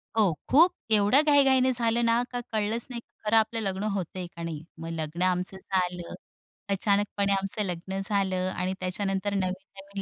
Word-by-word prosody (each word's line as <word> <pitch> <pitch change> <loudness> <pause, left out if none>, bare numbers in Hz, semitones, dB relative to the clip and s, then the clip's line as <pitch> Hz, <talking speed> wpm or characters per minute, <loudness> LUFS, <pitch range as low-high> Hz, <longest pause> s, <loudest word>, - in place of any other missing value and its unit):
हो 210 -5 +4 0.2
खूप 330 +7 +6 0.2
एवढ्या 210 +6 +5
घाई-घाईने 270 -4 +4
झालं 235 -1 +1
ना 230 +1 +3
का 245 - -2
कळलंच 220 +1 -1
नाही 235 -1 -6 0.2
खरं 215 +1 +2
आपलं 220 +1 +2
लग्न 195 -1 -2
होतंय 185 -1 -4
का 170 - -6
नाही? 160 -2 -5 0.2
मग 165 0 -6
लग्न 160 +1 -4
आमचं 185 +1 0
झालं, 180 -2 -2 0.6
अचानकपणे 200 0 +1
आमचं 195 +2 -1
लग्न 190 +1 -4
झालं 190 -2 +1
आणि 185 +1 -1
त्याच्यानंतर 195 +2 -1
नवीन-नवीन 195 +1 -4
195 Hz, 155 wpm, -27 LUFS, 185-220 Hz, 0.6 s, खूप